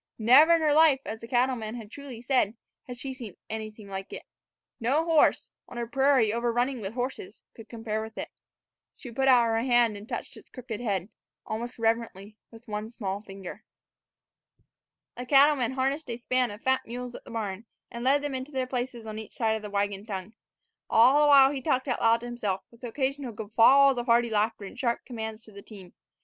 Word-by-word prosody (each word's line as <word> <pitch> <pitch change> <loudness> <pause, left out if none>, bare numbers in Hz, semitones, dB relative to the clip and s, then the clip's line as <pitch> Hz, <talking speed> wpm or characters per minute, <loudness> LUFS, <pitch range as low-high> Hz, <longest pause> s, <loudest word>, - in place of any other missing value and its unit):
Never 270 +9 +6
in 330 - 0
her 305 -2 +3
life, 305 -3 +5
as 220 0 -6
the 230 - -9
cattleman 240 -3 -1
truly 250 0 -10
said, 245 -5 +1 0.3
had 245 -1 -7
she 265 +1 -5
seen 235 -8 -10
anything 215 -1 -7
like 195 0 -7
it. - - -7 0.6
No 275 +8 +1
horse, 325 -3 +3 0.2
on 245 - -9
a 235 - -2
prairie 265 -3 +2
overrunning 240 +2 0
with 200 +3 -6
horses, 270 +11 -5
could 225 -1 -13
compare 225 -2 -4
with 220 0 -9
it. - - -5 0.7
She 245 - -10
put 265 +3 0
out 250 -2 +6
her 225 0 +1
hand 240 -3 +3
and 205 +2 -11
touched - - -5
its - - -15
crooked 245 -4 -7
head, 200 -5 -2 0.4
almost 235 +3 -5
reverently, 225 -3 -2
with 230 +2 -16
one 210 0 -4
small 200 -4 -4
finger. 195 -3 -10 1.5
The 250 0 -6
cattleman 275 -3 +4
harnessed 270 +3 -1
a 235 - -3
span 250 +1 0
of 205 +2 -10
fat 260 0 +2
mules 245 +1 -6
at - - -10
the - - -14
barn, 215 -1 -5 0.2
and 235 0 -6
led 280 +3 +3
them 290 -2 -3
into 260 +2 -5
their 260 -2 -1
places 250 -2 -4
on 215 0 -6
each 220 - -10
side 220 -2 +1
of 220 - -6
a 210 - -6
wagon 200 0 -2
tongue. 195 0 -6 0.6
All 255 +6 +6
the 295 - +5
while 275 -2 +7
he 275 -2 -4
talked 260 -2 0
out 250 - -1
loud 230 0 +4
to - - -7
himself, 210 -6 -3
with 235 +1 -21
occasional 265 +1 -3
guffaws 240 +5 +4
of 240 - -5
hearty 235 0 +3
laughter 215 0 0
and 245 - -10
sharp 235 -2 -1
commands 220 -2 -6
to 220 - -12
the 200 0 -11
team. 195 -4 -13
235 Hz, 200 wpm, -27 LUFS, 220-260 Hz, 1.5 s, while